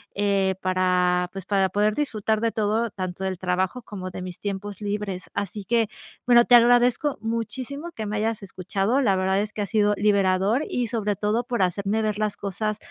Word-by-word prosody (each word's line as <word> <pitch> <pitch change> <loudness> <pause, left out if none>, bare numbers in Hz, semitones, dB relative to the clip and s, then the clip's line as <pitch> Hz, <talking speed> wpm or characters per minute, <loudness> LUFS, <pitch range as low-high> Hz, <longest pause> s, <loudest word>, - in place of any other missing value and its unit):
eh, 200 -2 +1
para, 180 -1 +2
pues, 195 -1 -7
para 195 -2 +2
poder 210 +2 +1
disfrutar 220 -7 0
de 230 0 +1
todo, 220 +2 0
tanto 185 -1 -5
del 190 -1 -2
trabajo 185 +6 -1
como 190 -4 -7
de 185 - -7
mis 180 -1 -7
tiempos 205 0 -5
libres, 205 -2 -4
así 200 +1 -4
que 230 -1 +2 0.4
bueno, 240 -1 +7
te 245 - +7
agradezco 245 +4 +4
muchísimo 250 +8 -4
que 220 - -5
me 210 +1 -2
hayas 220 -1 -1
escuchado, 195 +7 -1
la 200 -7 +3
verdad 190 +1 +1
es 215 +1 -4
que 210 - -4
ha - - -1
sido 210 0 +2
liberador, 200 +4 +2
y 245 -2 -1
sobre 210 -3 -1
todo 215 +4 0
por 240 -5 -1
hacerme 200 +4 0
ver 215 -1 -1
las 210 -1 0
cosas 205 +2 -3
205 Hz, 190 wpm, -24 LUFS, 190-225 Hz, 0.4 s, bueno